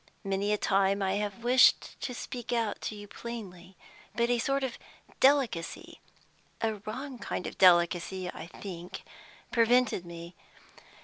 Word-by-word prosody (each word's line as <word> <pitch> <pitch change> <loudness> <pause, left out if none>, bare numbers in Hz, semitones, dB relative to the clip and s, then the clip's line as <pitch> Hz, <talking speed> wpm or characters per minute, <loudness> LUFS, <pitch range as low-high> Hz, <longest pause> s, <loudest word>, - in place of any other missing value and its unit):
Many 195 +1 0
a 210 - +2
time 195 0 +2
I 190 0 +1
have 210 +2 -4
wished 250 +2 +4
to 250 - -4
speak 245 0 -6
out 230 -4 -1
to 215 - -4
you 205 0 -9
plainly, 195 -5 -8 0.4
but 235 +1 +2
a 240 - +2
sort 275 +3 0
of 260 -3 -3 0.4
delicacy 265 - +1 0.6
a 220 -1 -1
wrong 255 +3 -5
kind 205 - -4
of - - -7
delicacy, 180 +1 +4
I 165 - -7
think 180 -1 -8 0.5
prevented 235 -4 +3
me. 170 0 -9
205 Hz, 140 wpm, -30 LUFS, 185-240 Hz, 0.6 s, wished